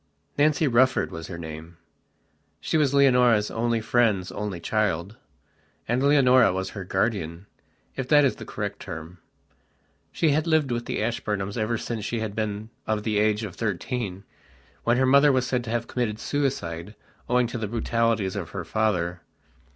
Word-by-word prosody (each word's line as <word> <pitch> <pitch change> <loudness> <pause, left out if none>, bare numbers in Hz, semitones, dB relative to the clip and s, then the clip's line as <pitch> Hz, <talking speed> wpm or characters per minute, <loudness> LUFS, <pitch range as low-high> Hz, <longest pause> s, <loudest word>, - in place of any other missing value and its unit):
Nancy 150 +1 +3
Rufford 130 +1 +3
was 80 0 -7
her 85 - -7
name; 80 +1 -8 0.8
she - - -3
was 150 -4 +3
Leonora's 125 -6 +4
only 115 0 0
friend's 110 -5 +1
only 105 -4 -4
child, 100 -1 -1 0.7
and 120 +2 +1
Leonora 130 -6 +5
was 95 +1 -3
her 100 - -6
guardian, 95 -3 -2 0.5
if 135 -2 -3
that 145 0 +6
is 135 - 0
the - - -8
correct 100 -1 -5
term. 80 +2 -8 0.9
She 160 - +1
had 155 +3 +1
lived 155 -5 +2
with 120 0 -2
the - - -1
Ashburnhams 105 -4 -2
ever 115 0 0
since 110 -1 -4
she 115 +2 -2
had 110 -2 -4
been 110 0 -3 0.2
of 110 -1 0
the 105 -2 0
age 105 +1 +2
of 100 -4 -5
thirteen, 105 -1 -3 0.6
when 120 +1 +3
her 130 - +3
mother 140 +2 +6
was 130 -1 +1
said 125 -1 -1
to - - -6
have 120 0 -1
committed 115 -4 -2
suicide 105 - -2 0.3
owing 125 0 +3
to 120 0 -4
the 110 - -2
brutalities 115 -3 0
of 90 -5 -4
her 90 0 -6
father. 90 -6 0
110 Hz, 165 wpm, -25 LUFS, 95-125 Hz, 0.9 s, that